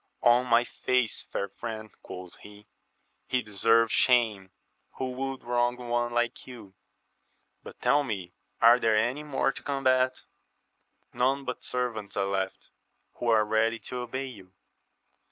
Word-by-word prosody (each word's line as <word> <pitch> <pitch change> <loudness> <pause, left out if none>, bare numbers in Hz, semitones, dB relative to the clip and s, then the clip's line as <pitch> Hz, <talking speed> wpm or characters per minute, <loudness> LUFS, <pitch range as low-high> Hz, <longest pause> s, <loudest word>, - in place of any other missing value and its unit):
On 120 +1 +5
my 115 0 +5
faith, 125 -2 -1
fair 100 - -2
friend, 110 +1 -7
quoth 90 0 -9
he, 105 0 -14 0.6
he 125 -1 0
deserves 115 +2 +3
shame 110 -7 +3 0.4
who 130 -1 -3
would 135 +1 -4
wrong 120 0 +1
one 120 -1 -1
like 120 0 -1
you! 115 -7 -11 0.9
but - - -12
tell 145 0 +4
me, 95 -9 -5 0.3
are 120 +2 +7
there 110 -2 +3
any 120 +7 +1
more 140 -2 0
to - - -8
combat? 130 -2 +1 0.4
— - - -45
None 135 +2 +2
but 125 -1 -5
servants 115 -5 -3
are 100 - +2
left, 95 -1 -3 0.5
who 120 - -3
are 110 -2 +4
ready 110 +2 +1
to 125 - -7
obey 125 +2 -4
you. 100 -8 -11
120 Hz, 145 wpm, -28 LUFS, 110-125 Hz, 0.9 s, are